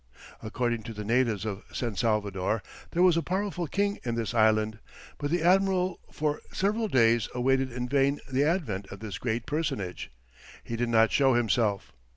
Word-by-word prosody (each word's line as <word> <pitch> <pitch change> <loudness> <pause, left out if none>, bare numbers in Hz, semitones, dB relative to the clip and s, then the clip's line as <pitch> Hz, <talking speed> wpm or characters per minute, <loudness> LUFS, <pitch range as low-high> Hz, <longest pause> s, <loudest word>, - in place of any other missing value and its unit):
According 120 +1 -2
to 115 -2 -7
the 105 0 -5
natives 115 -3 +1
of 100 -2 -4
San 120 -4 -3
Salvador, 105 -2 0 0.3
there 175 - +2
was 180 -3 +5
a - - +2
powerful 185 -1 -2
king 200 +6 0
in 120 -2 -2
this 115 -1 -2
island, 110 -1 +2 0.4
but 145 - -2
the 170 +1 0
admiral 185 0 +2
for 150 -1 -1
several 215 +3 0
days 115 - +3
awaited 130 +1 +1
in 125 0 -3
vain 140 +2 +2
the 135 +1 +1
advent 145 - -1
of 95 - -10
this 110 -3 -6
great 115 -1 -2
personage; 105 - -3 0.5
he 115 - -5
did 120 +1 -1
not 115 -1 +4
show 135 -3 +4
himself. 110 -3 +1
120 Hz, 175 wpm, -28 LUFS, 110-155 Hz, 0.5 s, was